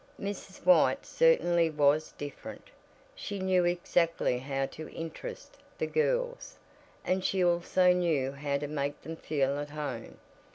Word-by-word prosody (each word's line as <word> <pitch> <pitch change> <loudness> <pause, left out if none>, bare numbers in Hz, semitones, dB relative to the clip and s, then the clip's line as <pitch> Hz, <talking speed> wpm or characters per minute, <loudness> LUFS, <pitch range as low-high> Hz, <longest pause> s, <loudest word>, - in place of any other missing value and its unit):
Mrs. 195 -1 -7
White 275 - +5
certainly 175 - +3
was 150 0 +2
different. 145 0 -8 0.4
She 205 - -6
knew 185 -2 +2
exactly 170 -6 +1
how 135 +1 -2
to 155 +3 -9
interest 165 - -8 0.2
the - - -1
girls, - - -1 0.5
and 185 0 0
she 190 -1 +1
also 175 +1 +3
knew 160 -7 +1
how 140 0 -2
to 145 - -4
make 145 0 -3
them 165 - -6
feel 140 -3 -1
at 145 0 -5
home. 145 -6 -6
165 Hz, 135 wpm, -30 LUFS, 145-185 Hz, 0.5 s, White